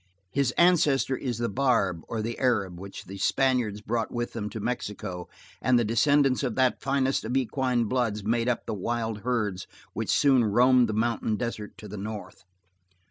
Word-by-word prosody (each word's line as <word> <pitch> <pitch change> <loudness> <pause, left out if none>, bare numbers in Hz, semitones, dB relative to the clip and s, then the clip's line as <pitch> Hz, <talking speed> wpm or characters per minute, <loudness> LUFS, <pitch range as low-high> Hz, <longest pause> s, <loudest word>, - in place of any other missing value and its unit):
His 140 +1 +1
ancestor 150 -7 +4
is 125 -4 -3
the 120 0 -1
Barb 110 -8 +1
or 110 -2 -3
the 115 +1 -4
Arab 100 -9 0
which 95 +1 -9
the 95 +1 -9
Spaniards 125 -3 +1
brought 115 +1 -2
with 120 0 -3
them 105 -3 -4
to 110 - -6
Mexico 100 -6 -4 0.3
and 125 -1 +3
the 120 - +2
descendants 135 +4 +3
of 125 -5 -2
that 130 -1 +2
finest 135 -1 0
of 120 +4 -1
equine 125 -1 0
bloods 110 -3 -1
made 115 +3 +1
up 120 - -1
the 110 - -3
wild 110 +2 -2
herds 105 -6 -2 0.3
which - - -4
soon 135 -4 +4
roamed 120 +3 +4
the - - -1
mountain 110 0 0
desert 110 -2 -5
to 105 - -10
the 105 +1 -7
north. 100 -1 -7
115 Hz, 180 wpm, -27 LUFS, 105-130 Hz, 0.3 s, ancestor